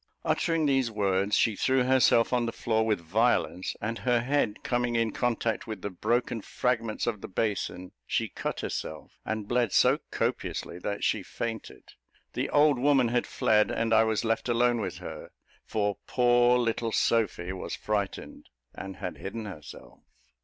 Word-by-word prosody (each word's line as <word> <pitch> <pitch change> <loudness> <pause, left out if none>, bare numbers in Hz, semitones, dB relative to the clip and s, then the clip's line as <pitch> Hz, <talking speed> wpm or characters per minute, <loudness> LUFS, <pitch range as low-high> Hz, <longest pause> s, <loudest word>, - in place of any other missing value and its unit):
Uttering 165 -2 +1
these 135 -4 +2
words, 100 -1 +1
she 110 - +2
threw 130 +4 +2
herself 125 -2 +4
on 120 -1 +2
the - - -1
floor 110 -1 0
with 105 -4 +1
violence, 95 +1 0
and 115 +2 -3
her 120 -2 +2
head 125 -4 0
coming 120 -1 0
in 115 -1 +1
contact 115 -2 -1
with 110 -4 -6
the 100 - -3
broken 120 +4 -1
fragments 115 -1 -1
of 110 -4 -2
the - - -6
basin, 95 -3 -2 0.2
she - - 0
cut - - -4
herself, 80 - -6
and 110 -2 -3
bled 120 -3 +1
so - - +4
copiously 85 - -3
that 100 +3 -4
she - - +1
fainted. 115 -2 -6 0.5
The - - -2
old 145 -3 +4
woman 135 -3 +3
had 120 +1 0
fled, 105 -1 +2
and 115 0 0
I 110 0 +6
was 110 +1 0
left 115 +2 0
alone 120 0 +2
with 95 -3 -4
her, - - -8 0.4
for 105 -2 -1
poor 120 0 +4
little 115 -1 0
Sophy 105 -6 +1
was 95 - -5
frightened, 105 -2 -4 0.2
and 95 -1 -7
had 90 - -6
hidden 110 +3 -5
herself. 80 -8 -10
115 Hz, 165 wpm, -28 LUFS, 105-120 Hz, 0.5 s, I